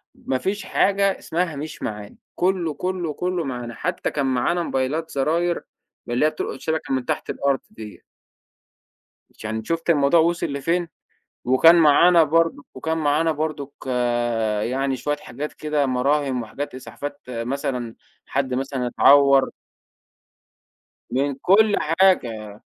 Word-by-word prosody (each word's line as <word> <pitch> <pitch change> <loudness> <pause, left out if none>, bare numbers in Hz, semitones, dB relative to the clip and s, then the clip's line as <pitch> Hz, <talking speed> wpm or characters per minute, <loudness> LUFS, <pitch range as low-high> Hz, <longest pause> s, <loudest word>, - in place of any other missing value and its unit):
ما 130 - -2
فيش 195 +9 -3
حاجة 200 0 +2
اسمها 170 -2 -2
مش 155 +2 -7
معانا، 105 -1 -6 0.2
كله، 180 -4 0
كله، 180 -3 -3
كله، 180 0 -2
معانا 120 -3 -5
حتى - - -3
كان 140 -2 -1
معانا 135 +7 +1
موبايلات 150 +5 -2
زراير 165 +5 0 0.4
من 120 - -3
اللي 125 - +2
هي 155 - +4
بتلقط 155 -3 -5
شبكة 160 -4 -2
من 130 -2 -1
تحت - - -3
الأرض 140 -2 0
ديّة. 110 -2 -10 1.4
عشان 110 0 -5
شُفتِ 165 +3 -3
الموضوع 145 +1 +4
وصل 170 +2 +1
لفين؟ 165 +5 -1 0.6
وكان 145 +7 +6
معانا 165 +2 +6
برضه 165 -1 +1
وكان 160 +5 -2
معانا 155 +2 +2
برضك 150 -2 -4 0.9
يعني 135 +2 -1
شوية 145 +4 -2
حاجات 145 +3 -7
كده 150 -2 -1
مراهم 130 0 0
وحاجات 135 +5 -6
إسعافات 130 +4 -7
مثلًا 125 0 -3 0.3
حد 130 -2 -1
مثلًا 135 -1 -2
اتعوّر. 140 +1 +5 1.6
من 140 +2 0
كل 205 +2 +4
حاجة. 120 - +1
145 Hz, 130 wpm, -22 LUFS, 130-165 Hz, 1.6 s, وكان